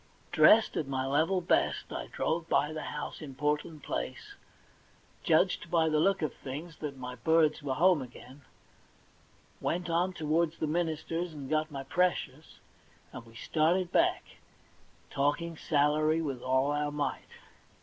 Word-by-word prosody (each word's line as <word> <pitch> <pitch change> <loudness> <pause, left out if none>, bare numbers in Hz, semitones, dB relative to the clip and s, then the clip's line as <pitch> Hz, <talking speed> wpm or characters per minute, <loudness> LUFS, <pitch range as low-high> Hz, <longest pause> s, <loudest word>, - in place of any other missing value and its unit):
Dressed 220 0 +6
at 150 - -1
my 130 -1 -2
level 160 +7 +1
best, 170 - 0
I - - -5
drove 165 +1 -2
by 150 +2 +2
the 155 - -4
house - - -6
in 140 -4 -8
Portland 150 +1 -2
Place, - - -5 0.9
judged - - +2
by 165 -2 +3
the 155 -1 +2
look 195 +1 +2
of 155 - -1
things 155 +5 -8
that 145 -3 -6
my 125 -1 -6
birds 155 +5 +2
were 135 -2 -2
home 175 0 +4
again, 130 +2 -11 1.2
went 175 0 -2
on 175 +3 +1
towards 160 0 0
the - - -1
minister's 165 +1 -2
and 140 -2 -7
got 155 0 +1
my 140 -3 -6
precious, 180 +6 -1 0.6
and 125 -2 -9
we 115 - -17
started 170 +7 +1
back, - - +2 0.9
talking 155 +4 0
salary 155 +1 +2
with 140 -6 -3
all 130 +2 +1
our 145 0 -1
might. 145 0 -3
155 Hz, 150 wpm, -30 LUFS, 140-165 Hz, 1.2 s, Dressed